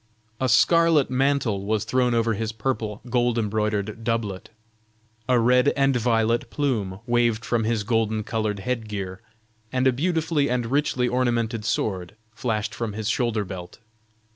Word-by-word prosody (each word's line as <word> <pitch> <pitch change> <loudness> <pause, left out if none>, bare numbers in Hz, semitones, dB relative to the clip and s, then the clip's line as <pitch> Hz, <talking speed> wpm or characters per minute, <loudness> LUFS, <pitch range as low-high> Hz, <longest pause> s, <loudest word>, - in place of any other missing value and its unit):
A 130 - +1
scarlet 165 +1 +4
mantle 130 -6 +1
was 105 0 0
thrown 125 +1 +1
over 115 -1 +2
his 110 +1 -2
purple 110 -2 -3
gold 120 -1 +1
embroidered 105 0 -1
doublet; 110 -5 -2 0.8
a 125 - +5
red 125 +3 +4
and 135 -1 +3
violet 115 -1 +1
plume 105 -10 -2
waved 120 -1 +1
from 115 -2 0
his 110 -2 0
golden 110 -1 0
colored 110 -2 -2
head 115 -1 -3
gear; 100 -1 -5 0.5
and 130 0 0
a 130 - +4
beautifully 160 0 0
and 125 -1 0
richly 135 -3 +1
ornamented 120 -3 0
sword 95 -4 -2 0.2
flashed 110 -3 -2
from 115 -2 -4
his 110 +1 -3
shoulder 115 -3 0
belt. 90 -2 -8
115 Hz, 145 wpm, -24 LUFS, 105-125 Hz, 0.8 s, a